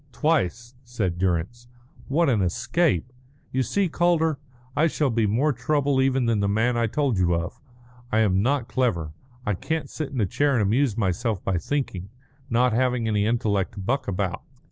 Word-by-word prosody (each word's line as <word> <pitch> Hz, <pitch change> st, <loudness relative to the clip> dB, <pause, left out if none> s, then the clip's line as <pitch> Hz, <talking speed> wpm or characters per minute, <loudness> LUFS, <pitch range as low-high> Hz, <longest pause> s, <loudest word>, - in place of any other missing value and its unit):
"Twice," 120 Hz, -, 0 dB
said 105 Hz, -8 st, -3 dB
Durrance. 95 Hz, +7 st, -1 dB, 0.4 s
"What 165 Hz, +5 st, +2 dB
an 115 Hz, -7 st, +2 dB
escape! 125 Hz, -, 0 dB, 0.4 s
You 130 Hz, -, +1 dB
see, 195 Hz, -, +1 dB
Calder, 160 Hz, -3 st, +1 dB, 0.4 s
I 155 Hz, +3 st, +4 dB
shall 150 Hz, -4 st, 0 dB
be 115 Hz, -2 st, +1 dB
more 135 Hz, +9 st, +2 dB
trouble 140 Hz, +2 st, +1 dB
even 130 Hz, -1 st, +2 dB
than 115 Hz, -2 st, +1 dB
the 100 Hz, -, +1 dB
man 110 Hz, +4 st, +1 dB
I 115 Hz, -1 st, +1 dB
told 130 Hz, -3 st, 0 dB
you 85 Hz, -1 st, +2 dB
of. 85 Hz, +1 st, -4 dB, 0.5 s
I 110 Hz, -, +3 dB
am 95 Hz, -3 st, +3 dB
not 130 Hz, +1 st, +1 dB
clever. 85 Hz, -, -1 dB, 0.3 s
I 105 Hz, -, +1 dB
can't 160 Hz, -, -3 dB
sit 155 Hz, -3 st, -4 dB
in 135 Hz, -, -4 dB
a 105 Hz, -, +3 dB
chair 145 Hz, +9 st, +1 dB
and 120 Hz, -, +2 dB
amuse 115 Hz, +2 st, +1 dB
myself 100 Hz, 0 st, -1 dB
by 95 Hz, -2 st, 0 dB
thinking, 100 Hz, -, -3 dB, 0.4 s
not 125 Hz, 0 st, +2 dB
having 125 Hz, -1 st, +1 dB
any 105 Hz, -1 st, +1 dB
intellect 110 Hz, -5 st, 0 dB
to 100 Hz, -, -8 dB
buck 120 Hz, +9 st, -1 dB
about. 95 Hz, -2 st, -2 dB
120 Hz, 180 wpm, -24 LUFS, 100-140 Hz, 0.5 s, I